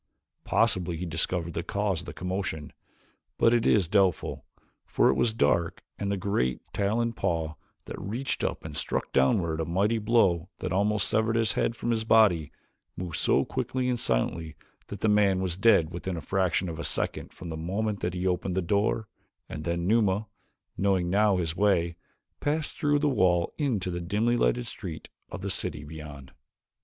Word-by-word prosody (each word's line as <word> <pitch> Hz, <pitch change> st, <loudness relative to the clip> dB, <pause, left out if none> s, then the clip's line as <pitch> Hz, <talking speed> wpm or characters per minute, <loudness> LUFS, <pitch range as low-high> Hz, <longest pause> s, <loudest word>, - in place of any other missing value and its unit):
Possibly 90 Hz, -7 st, +1 dB
he 90 Hz, -, -4 dB
discovered 85 Hz, +1 st, -2 dB
the 85 Hz, -, -2 dB
cause 100 Hz, 0 st, -1 dB
of -, -, -10 dB
the -, -, -5 dB
commotion, 90 Hz, -3 st, -4 dB, 0.6 s
but 115 Hz, -, +4 dB
it 120 Hz, -1 st, +2 dB
is 100 Hz, -6 st, +4 dB
doubtful, 95 Hz, -2 st, +1 dB, 0.4 s
for -, -, +2 dB
it -, -, +4 dB
was 110 Hz, -, +2 dB
dark 85 Hz, -5 st, +1 dB, 0.2 s
and 100 Hz, 0 st, -1 dB
the 100 Hz, -, 0 dB
great, 90 Hz, -, 0 dB
taloned 115 Hz, +3 st, 0 dB
paw 80 Hz, -6 st, -1 dB, 0.3 s
that -, -, -7 dB
reached 130 Hz, +8 st, -2 dB
up -, -, -2 dB
and 75 Hz, -2 st, -6 dB
struck -, -, -2 dB
downward 80 Hz, +4 st, +2 dB
a -, -, -1 dB
mighty 100 Hz, +7 st, +1 dB
blow 100 Hz, -6 st, +2 dB
that 95 Hz, -, -4 dB
almost 105 Hz, +1 st, +2 dB
severed 110 Hz, +1 st, +1 dB
his 115 Hz, -1 st, +2 dB
head 115 Hz, -, 0 dB
from 120 Hz, -, -2 dB
his 110 Hz, -1 st, 0 dB
body, 105 Hz, -9 st, +4 dB, 0.5 s
moved 90 Hz, -2 st, -4 dB
so -, -, +2 dB
quickly 130 Hz, -1 st, -2 dB
and 125 Hz, -1 st, 0 dB
silently 80 Hz, -, -1 dB, 0.3 s
that 100 Hz, -, -8 dB
the -, -, +2 dB
man 105 Hz, -3 st, +4 dB
was 90 Hz, -3 st, -1 dB
dead 100 Hz, -5 st, +4 dB
within 90 Hz, 0 st, -4 dB
a -, -, -4 dB
fraction 95 Hz, +1 st, 0 dB
of 80 Hz, -1 st, -5 dB
a -, -, -3 dB
second -, -, -2 dB
from 90 Hz, -, -9 dB
the 80 Hz, -, -4 dB
moment 100 Hz, +6 st, -2 dB
that 90 Hz, +1 st, -2 dB
he 90 Hz, +1 st, -2 dB
opened 90 Hz, 0 st, 0 dB
the -, -, +2 dB
door, 105 Hz, +4 st, +1 dB, 0.4 s
and 75 Hz, -, -7 dB
then 85 Hz, 0 st, -1 dB
Numa, 105 Hz, 0 st, +2 dB, 0.5 s
knowing 95 Hz, -3 st, +1 dB
now 100 Hz, 0 st, +4 dB
his 85 Hz, -2 st, -2 dB
way, 90 Hz, -4 st, +2 dB, 0.4 s
passed 150 Hz, +1 st, -1 dB
through 145 Hz, -3 st, +2 dB
the 150 Hz, +1 st, +1 dB
wall 90 Hz, -10 st, +2 dB
into 110 Hz, -11 st, 0 dB
the 85 Hz, 0 st, -3 dB
dimly 105 Hz, +7 st, +1 dB
lighted 120 Hz, 0 st, +1 dB
streets 90 Hz, -8 st, -7 dB, 0.2 s
of 90 Hz, -, -7 dB
the 100 Hz, 0 st, -3 dB
city 80 Hz, -5 st, -4 dB
beyond. 75 Hz, -3 st, -9 dB
95 Hz, 185 wpm, -28 LUFS, 85-110 Hz, 0.6 s, but